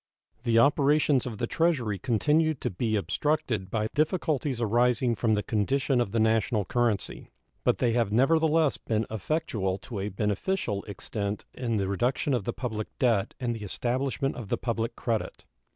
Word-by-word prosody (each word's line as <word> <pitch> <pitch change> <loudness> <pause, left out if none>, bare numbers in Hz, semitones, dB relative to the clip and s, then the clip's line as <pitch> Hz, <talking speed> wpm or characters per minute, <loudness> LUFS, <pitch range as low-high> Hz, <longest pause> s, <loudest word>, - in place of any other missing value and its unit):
The 115 -1 +2
operations 140 +1 +4
of 110 -4 -5
the 120 - -1
Treasury 125 - 0
continued 150 +5 +2
to - - -1
be 110 +4 -1
obstructed 115 -3 -1
by 110 +1 -1
difficulties 150 -4 0
arising 120 +2 +2
from 110 0 +1
the 105 - -1
condition 130 +4 +1
of 100 - -2
the 115 - 0
national 110 -1 +2
currency, 115 -2 -1 0.3
but - - +2
they 120 -2 +1
have 115 -4 +1
nevertheless 155 +5 +3
been 110 0 -1
effectual 105 - -1
to 100 +3 -7
a 100 +2 -2
beneficial 105 - -1
extent 100 0 -4
in 115 -3 -2
the 100 -1 0
reduction 125 +8 0
of 120 -6 0
the - - 0
public 110 -4 -4
debt 115 -6 +1
and 120 -2 -1
the 110 - -7
establishment 130 +6 -1
of 115 -6 -7
the - - +1
public 115 -1 -2
credit. 115 -3 -3
120 Hz, 165 wpm, -28 LUFS, 105-135 Hz, 0.3 s, operations